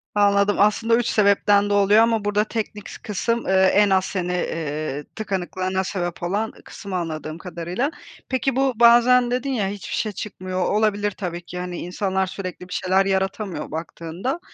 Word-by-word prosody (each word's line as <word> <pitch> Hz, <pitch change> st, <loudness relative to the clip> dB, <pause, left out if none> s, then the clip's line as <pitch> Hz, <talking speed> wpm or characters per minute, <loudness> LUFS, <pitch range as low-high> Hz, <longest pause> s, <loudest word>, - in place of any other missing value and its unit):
Anladım 200 Hz, 0 st, +3 dB
aslında 215 Hz, +3 st, +3 dB
3 240 Hz, 0 st, +1 dB
sebepten 205 Hz, 0 st, +3 dB
de -, -, +1 dB
oluyor 205 Hz, +2 st, +5 dB
ama 225 Hz, -2 st, +1 dB
burda 205 Hz, 0 st, +2 dB
teknik 215 Hz, -2 st, -5 dB
s -, -, -9 dB
kısım, 230 Hz, +3 st, -1 dB
eee, 190 Hz, -, +2 dB, 0.2 s
en 205 Hz, 0 st, +5 dB
az 190 Hz, +1 st, +1 dB
hani, 180 Hz, -1 st, -1 dB
eee, 155 Hz, -4 st, -3 dB
tıkanıklığına 190 Hz, -2 st, -2 dB
sebep 175 Hz, -3 st, -4 dB
olan 205 Hz, +5 st, -1 dB
kısım 200 Hz, -2 st, -9 dB
anladığım 160 Hz, -3 st, -4 dB
kadarıyla. 180 Hz, -, -3 dB, 0.4 s
Peki 260 Hz, 0 st, 0 dB
bu 270 Hz, 0 st, +2 dB
bazen 240 Hz, +1 st, +6 dB
dedin 250 Hz, +2 st, -1 dB
ya 215 Hz, -7 st, 0 dB
hiçbir 200 Hz, 0 st, -5 dB
şey 215 Hz, -, -1 dB
çıkmıyor. 185 Hz, -2 st, -5 dB
Olabilir 205 Hz, -1 st, +1 dB
tabii 180 Hz, -3 st, -5 dB
ki 180 Hz, -, -7 dB
hani 180 Hz, -1 st, -5 dB
insanlar 190 Hz, +2 st, -1 dB
sürekli 180 Hz, -1 st, -7 dB
bir 180 Hz, -, -8 dB
şeyler 190 Hz, +1 st, +2 dB
yaratamıyor 190 Hz, -3 st, -2 dB
baktığında. 165 Hz, -, -4 dB
200 Hz, 165 wpm, -22 LUFS, 180-215 Hz, 0.4 s, bazen